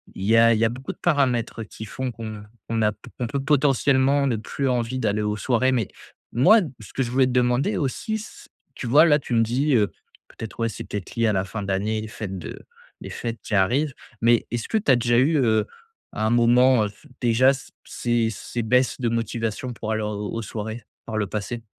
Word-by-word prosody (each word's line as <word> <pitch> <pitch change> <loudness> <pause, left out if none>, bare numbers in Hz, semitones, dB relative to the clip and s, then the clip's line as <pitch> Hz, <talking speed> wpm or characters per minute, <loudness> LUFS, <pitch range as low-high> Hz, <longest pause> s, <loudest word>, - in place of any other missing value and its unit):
il 95 - -6
y 110 +3 +3
a 115 0 +6
il - - -1
y 115 - +4
a - - +2
beaucoup 130 +3 -6
de - - -14
paramètres 125 -8 0
qui 110 +1 -9
font 130 +4 -4
qu'on 110 -2 -7 0.2
qu'on 115 -1 -1
a 105 - +3
p - - -30 0.2
on 120 - -1
peut 140 +3 -2
potentiellement 140 -1 +3
ne 120 -5 +1
plus 135 +5 -3
envie 125 0 -1
d'aller 105 -4 0
aux 105 0 -1
soirées. 130 +4 +1
Mais, 120 -5 0 0.5
moi, 195 - +6 0.2
ce 105 - -13
que 135 - 0
je 120 - -4
voulais 130 0 +3
te - - -2
demander 125 - +1
aussi, 195 - -2
c 215 - -11 0.3
tu 125 - -6
vois 150 +7 +6
là, 150 -2 +4
tu 125 -3 -3
me 115 - +4
dis, 130 +5 +1
heu, 105 -4 +2 0.4
peut-être, 110 +1 -9
ouais 115 - +1
c'est - - -7
peut-être 100 -3 -6
lié 115 -1 +2
à 105 - +2
la 95 0 0
fin 105 +2 -5
d'année, 100 +3 -1
les 110 - -6
fêtes 100 -4 -6
de - - -8 0.4
des - - -8
fêtes 115 -2 -5
qui - - -6
arrivent. 125 +9 +2 0.3
Mais, 115 0 +3
est-ce 120 -1 -3
que 220 - +1
tu 195 - +2
as 130 - +7
déjà 120 0 +2
eu, 150 +4 +3
heu, 110 -4 +2 0.4
à 110 - -2
un 110 - +2
moment, 120 0 +4
heu, 105 - -3 0.3
déjà 125 +3 +4
c 135 - -9
ces 120 -2 0
ces 120 +3 -5
baisses 125 -1 +2
de 120 -2 0
motivation 115 +1 -2
pour 110 -1 -5
aller, 110 0 0
heu, 105 - -2
aux 105 +2 -4
soirées, 110 +1 -6 0.2
par 110 -2 -4
le 105 -2 0
passé? 110 +3 -4
115 Hz, 230 wpm, -24 LUFS, 110-130 Hz, 0.5 s, as